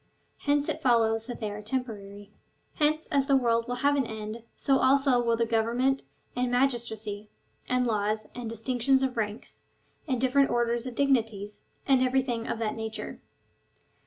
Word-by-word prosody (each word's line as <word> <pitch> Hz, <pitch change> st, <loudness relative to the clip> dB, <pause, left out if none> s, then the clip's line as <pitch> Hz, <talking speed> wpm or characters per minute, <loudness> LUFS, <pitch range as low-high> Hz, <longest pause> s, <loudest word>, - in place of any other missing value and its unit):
Hence 290 Hz, 0 st, +1 dB
it -, -, -2 dB
follow^s 225 Hz, -3 st, +2 dB
that 245 Hz, -, -6 dB
they 215 Hz, -3 st, -3 dB
are 205 Hz, +1 st, -6 dB
temporary. 205 Hz, -4 st, -5 dB, 0.5 s
Hence 310 Hz, +1 st, +2 dB
as 275 Hz, -2 st, +2 dB
the 275 Hz, -, +4 dB
world 230 Hz, -2 st, +1 dB
will 245 Hz, -, -2 dB
have 285 Hz, 0 st, +5 dB
an 270 Hz, -4 st, +1 dB
end, 220 Hz, +1 st, -6 dB
so 270 Hz, -1 st, +2 dB
also 270 Hz, -2 st, +4 dB
will 235 Hz, -1 st, +2 dB
govern 230 Hz, 0 st, +1 dB
ment, 270 Hz, +1 st, +2 dB, 0.3 s
and 250 Hz, 0 st, 0 dB
magistracy, 225 Hz, -5 st, -1 dB, 0.4 s
and 250 Hz, 0 st, +2 dB
laws, 215 Hz, -1 st, 0 dB
and 240 Hz, -2 st, -5 dB
distinctions 250 Hz, +4 st, +1 dB
of 260 Hz, -1 st, -1 dB
ranks, 215 Hz, -1 st, -4 dB, 0.5 s
and 260 Hz, -4 st, 0 dB
different 265 Hz, +2 st, +3 dB
orders 240 Hz, +1 st, 0 dB
of 250 Hz, -, -6 dB
dignities, 225 Hz, -7 st, 0 dB, 0.3 s
and 265 Hz, -2 st, +4 dB
everything 255 Hz, -3 st, 0 dB
of -, -, -2 dB
that 220 Hz, -1 st, -1 dB
nature. 220 Hz, -1 st, -6 dB
240 Hz, 160 wpm, -28 LUFS, 220-265 Hz, 0.5 s, have